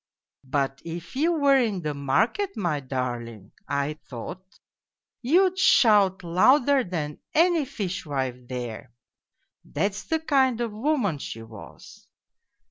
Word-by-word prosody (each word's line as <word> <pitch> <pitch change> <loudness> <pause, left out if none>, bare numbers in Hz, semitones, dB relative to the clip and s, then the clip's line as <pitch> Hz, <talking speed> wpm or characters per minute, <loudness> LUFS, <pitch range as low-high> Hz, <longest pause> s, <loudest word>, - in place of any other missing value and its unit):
But 135 0 -1
if 170 +2 -8
you 315 +6 +2
were 285 -4 +4
in 210 -8 -1
the 150 -1 -2
market, 220 - 0
my 175 -8 -1
darling, 120 -6 -5 0.2
I 140 +2 -2
thought 130 +9 -7 0.8
you'd 365 +8 +3
shout 210 - +4
louder 255 - +4
than 155 -6 -4 0.2
any 335 -1 +4
fishwife 145 - -4
there.... 120 -1 -6 0.7
That's 200 0 -2
the 320 - 0
kind 265 -6 +2
of 235 -2 -2
woman 220 - 0
she 115 -4 -7
was. 110 -2 -13
185 Hz, 120 wpm, -25 LUFS, -, 0.8 s, were